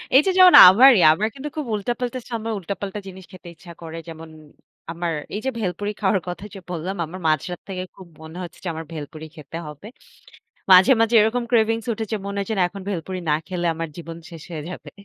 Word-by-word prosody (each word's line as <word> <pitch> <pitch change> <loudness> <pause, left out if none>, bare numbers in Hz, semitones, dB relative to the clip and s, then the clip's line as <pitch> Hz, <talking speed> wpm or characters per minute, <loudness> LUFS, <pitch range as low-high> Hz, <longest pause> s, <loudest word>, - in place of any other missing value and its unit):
এইযে, 295 +8 +6
যেমন 370 -1 +8
আমারই, 235 +5 +7
আমার 210 +7 -1
কিন্তু 280 +2 -6
খুব 300 - -3
উল্টাপাল্টা 240 +4 -3
সময়, 225 -1 -3
উল্টাপাল্টা 200 +2 -5
জিনিস 190 -1 -11
খেতে 185 -2 -13
ইচ্ছা 170 +2 -14
করে। 165 0 -8
যেমন 165 0 -10 0.6
আমার 170 0 -3 0.2
এইযে, 220 +6 -2
ভেলপুরি 205 +1 -3
খাওয়ার 195 -1 +2
কথা 180 +3 -6
যে, 195 - -9
বললাম, 180 +2 -4
আমার 180 +4 -9
মাঝরাত 160 +3 -1
থেকে 185 -1 -4
খুব 190 -2 -13
মনে 160 +2 -10
হচ্ছে 175 -1 -10
যে, - - -5
আমার 160 0 -7
ভেলপুরি 155 0 -8
খেতে 155 0 -9
হবে। 150 +6 -10 0.8
মাঝে, 185 +7 +8
মাঝে 225 +1 +2
এরকম 230 +3 +1
cravings 225 -1 +1
উঠে 220 +1 -4
যে - - +1
মনে 200 0 -4
হচ্ছে 200 +3 -3
না - - +3
এখন 195 +2 -10
ভেলপুরি 185 -1 -4
না 150 - +4
খেলে 175 0 -3
আমার 165 0 -5
জীবন 165 -1 -8
শেষ 165 -3 -11
হয়ে 160 -3 -5
যাবে। - - -9
185 Hz, 200 wpm, -22 LUFS, 165-220 Hz, 0.8 s, যেমন